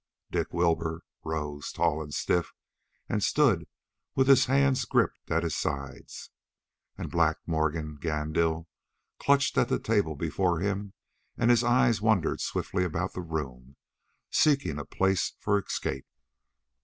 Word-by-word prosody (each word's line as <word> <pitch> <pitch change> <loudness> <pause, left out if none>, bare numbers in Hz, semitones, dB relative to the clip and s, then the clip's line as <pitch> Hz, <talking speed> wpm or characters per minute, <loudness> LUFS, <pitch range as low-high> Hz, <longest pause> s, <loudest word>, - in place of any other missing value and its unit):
Dick - - -1
Wilbur 85 -1 0 0.2
rose, 75 -2 -4
tall 80 - +1
and 75 -1 -7
stiff, 85 +4 0 0.6
and - - -1
stood - - +3 0.5
with 130 0 +3
his 135 -1 +7
hands 135 0 +3
gripped - - 0
at 85 +1 +1
his 80 -4 -1
sides, 70 0 -5 0.7
and - - -5
Black 85 -2 +2
Morgan 80 -2 -1
Gandil 80 +1 0 0.5
clutched 140 0 +3
at 120 - +2
the - - +2
table 100 -8 0
before 85 +3 0
him 100 +1 -2 0.4
and 120 - +4
his 120 -1 +4
eyes 120 -2 +3
wandered 110 -5 +2
swiftly 90 -1 -1
about 90 +1 -2
the 90 - -4
room, 70 -6 -5 0.6
seeking 140 - +2
a 75 - -6
place 95 -2 0
for 100 - +2
escape. 65 -7 -4
85 Hz, 135 wpm, -28 LUFS, 80-110 Hz, 0.7 s, his